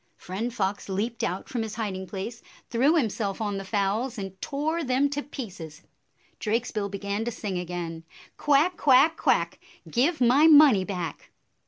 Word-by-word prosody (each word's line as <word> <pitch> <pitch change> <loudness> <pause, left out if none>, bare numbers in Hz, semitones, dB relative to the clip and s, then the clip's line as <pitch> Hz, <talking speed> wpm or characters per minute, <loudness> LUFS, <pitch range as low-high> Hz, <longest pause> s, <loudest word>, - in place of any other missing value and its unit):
" - - -44
Friend 210 +7 -4
Fox 200 -3 -2
leaped 215 +5 -2
out 185 +2 -2
from 240 - -3
his 220 -1 -5
hiding 195 -4 -4
place, 210 +5 -6 0.3
threw 270 +7 +3
himself 220 - -1
on 205 -3 -2
the - - -6
fowls, 210 +5 -1
and 195 -2 -7
tore 315 +3 -2
them 270 +1 +1
to 290 0 -2
pieces. 190 - -8 0.6
Drakesbill 215 -2 -1
began 200 +2 -3
to - - -1
sing 200 -5 -4
again, 170 -2 -5 0.2
" - - -22
Quack, 295 +5 +3
quack, 280 +4 +5
quack! - - +1 0.3
Give 295 +7 +1
my 260 +5 +5
money 290 -10 +7
back." 180 -6 -5
220 Hz, 165 wpm, -26 LUFS, 195-270 Hz, 0.6 s, money